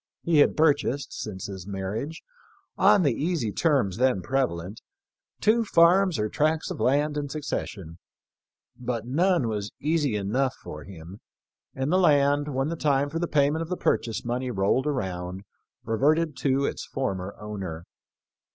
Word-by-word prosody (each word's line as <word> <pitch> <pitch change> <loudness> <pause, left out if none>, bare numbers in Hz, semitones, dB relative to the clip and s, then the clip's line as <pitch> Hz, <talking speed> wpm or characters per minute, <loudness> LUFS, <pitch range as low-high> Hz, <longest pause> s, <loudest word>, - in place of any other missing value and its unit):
He 165 -3 +3
had - - +4
purchased, 145 -3 +1
since 95 -4 -6
his 95 -2 -7
marriage, 105 - -4 0.5
on 200 0 +5
the 140 -5 +3
easy 150 -6 -1
terms 130 - +1
then 125 -7 +2
prevalent, 110 -8 -2 0.6
two 230 +2 +3
farms 180 -1 +4
or 105 - 0
tracts 155 +7 0
of - - -5
land 145 +3 +1
in 145 -1 -3
succession; 105 - -5 0.8
but 120 -3 -4
none 170 +1 +2
was 105 -2 -3
easy 150 -5 +1
enough 125 +7 0
for 75 -1 -8
him, 90 +1 -11 0.6
and 135 +3 -1
the 185 - +4
land, 145 -3 +3
when 135 0 -1
the 170 - -2
time 145 -2 +1
for 165 - -2
the 175 - -1
payment 150 +1 +2
of 165 - -5
the 180 - -2
purchase 115 0 -1
money 125 +2 -2
rolled 115 +6 +1
around, 95 -8 -3 0.4
reverted 150 +7 +1
to 140 0 +1
its - - -3
former 100 -7 -3
owner. 95 -6 -6
135 Hz, 150 wpm, -26 LUFS, 105-155 Hz, 0.8 s, on